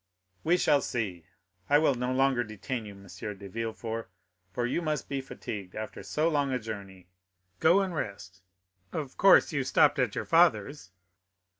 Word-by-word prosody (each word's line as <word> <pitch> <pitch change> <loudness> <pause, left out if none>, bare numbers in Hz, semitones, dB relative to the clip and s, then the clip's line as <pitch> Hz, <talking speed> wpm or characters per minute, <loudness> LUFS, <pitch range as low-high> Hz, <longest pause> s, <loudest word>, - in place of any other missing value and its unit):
"We 175 +3 +3
shall 145 -5 +3
see. 95 -9 -3 0.4
I 145 - +6
will 150 -2 +3
no 125 0 -2
longer 130 -1 +2
detain 110 +2 -5
you, 100 - -9
M. 100 0 -15
de 100 +1 -7
Villefort, 115 0 -4 0.4
for 120 +6 -1
you 125 +7 -1
must 155 -4 -2
be 140 -1 -2
fatigued 105 -7 -7
after 110 0 -6
so 155 +2 0
long 145 -4 +1
a 130 - +1
journey; 100 -5 -8 0.5
go 175 +5 +5
and 190 -2 -2
rest. 100 - -6 0.5
Of 145 -4 -5
course 195 -3 +6
you 140 -3 0
stopped 140 +2 +3
at 125 -6 +1
your - - -2
father's?" 145 - +2
125 Hz, 165 wpm, -29 LUFS, 105-145 Hz, 0.5 s, I